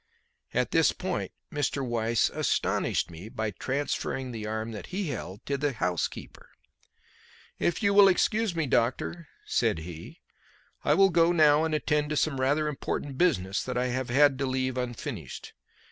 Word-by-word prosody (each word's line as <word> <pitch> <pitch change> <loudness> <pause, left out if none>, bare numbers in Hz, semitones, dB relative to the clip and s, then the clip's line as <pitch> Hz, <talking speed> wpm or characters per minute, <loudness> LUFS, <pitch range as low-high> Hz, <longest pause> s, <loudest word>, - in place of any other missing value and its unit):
At - - 0
this - - +4
point - - -3 0.2
Mr. 140 -2 -1
Weiss 115 -1 +1
astonished - - 0
me 85 +6 -9
by 110 -1 -3
transferring 135 +2 -3
the 110 -2 -5
arm 110 +1 -3
that 105 - -7
he 185 -2 -3
held 105 -5 -6
to 140 -1 -2
the 145 -1 0
housekeeper. 90 -6 -3 1.1
"If 175 - 0
you 200 0 +3
will 200 0 +8
excuse 210 +1 +2
me, 165 -2 0
doctor," 130 +7 0 0.2
said - - +1
he, 85 -2 -10 0.6
"I - - +3
will 195 -1 +5
go 170 0 +4
now 155 -2 +5
and 160 -1 0
attend 150 -1 0
to 150 - -1
some 140 -4 0
rather 145 +3 +2
important 140 -1 -4
business 100 - +2
that 125 -1 -4
I 125 0 0
have 130 0 -2
had 135 +1 +4
to 135 - 0
leave 130 0 -1
unfinished. 125 -2 -5
135 Hz, 160 wpm, -28 LUFS, 115-155 Hz, 1.1 s, will